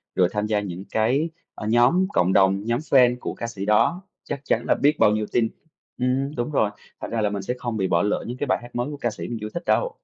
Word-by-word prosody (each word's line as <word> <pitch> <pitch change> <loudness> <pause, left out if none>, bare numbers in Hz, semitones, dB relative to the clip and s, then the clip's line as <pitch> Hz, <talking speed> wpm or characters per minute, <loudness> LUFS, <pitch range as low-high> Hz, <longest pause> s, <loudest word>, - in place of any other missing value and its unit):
rồi 90 - +4
tham 105 0 -1
gia 105 -1 +1
những 95 -2 -6
cái, 130 +9 +1 0.3
ờ, 105 - -5
nhóm 125 +12 +4
cộng 90 +2 +2
đồng, 95 +1 +3
nhóm 120 +1 0
fan 125 -5 +4
của - - -4
ca 115 - -5
sĩ 100 -4 -5
đó, 105 - +3 0.2
chắc 140 - -4
chắn 115 - +1
là - - +4
biết 150 +2 +2
bao 105 - +5
nhiêu 105 0 0
tin. 115 -2 +2 0.5
Ừm 135 +3 0
đúng 120 +4 -2
rồi, 110 -7 +2 0.3
thành - - -5
ra 115 - 0
là 105 - +2
mình 100 -1 -3
sẽ 120 +6 -2
không 120 -3 -3
bị 95 -2 0
bỏ 85 -1 +2
lỡ 105 - 0
những 125 +2 -5
cái 145 - -2
bài - - +2
hát 120 0 -13
mới 120 +3 -1
của 145 - -6
ca 120 -4 -1
sĩ - - -7
mình 120 - -4
chưa 105 - -4
thích 170 - -4
đâu. - - +2
120 Hz, 275 wpm, -24 LUFS, 105-130 Hz, 0.5 s, bao